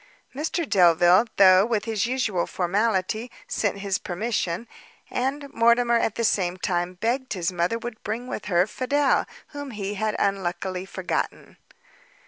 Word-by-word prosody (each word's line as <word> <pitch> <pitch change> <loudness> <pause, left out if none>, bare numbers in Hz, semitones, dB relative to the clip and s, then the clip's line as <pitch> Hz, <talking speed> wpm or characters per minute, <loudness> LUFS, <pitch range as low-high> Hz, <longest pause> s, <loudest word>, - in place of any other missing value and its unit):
Mr 315 +3 -2
Delvile, 175 +2 +5
though 185 -1 +7
with 220 -2 -1
his 220 -2 -1
usual 235 -9 0
formality, 205 +4 0 0.2
sent 205 -2 -1
his 195 -2 -2
permission; 195 0 -2 0.4
and 275 +3 -2
Mortimer 235 +1 +4
at 220 - -1
the 230 - -1
same 185 -4 +1
time, 180 -1 -2
begged 240 +7 -1
his 180 -3 -1
mother 175 +5 0
would 235 -1 -7
bring 225 +4 -4
with 215 - -5
her 175 -2 +3
Fidel, 270 +6 +1 0.2
whom 285 -2 -7
he 205 -4 -4
had 215 +1 -1
unluckily 190 -1 -2
forgotten. 185 -1 -4
210 Hz, 140 wpm, -25 LUFS, 185-235 Hz, 0.4 s, though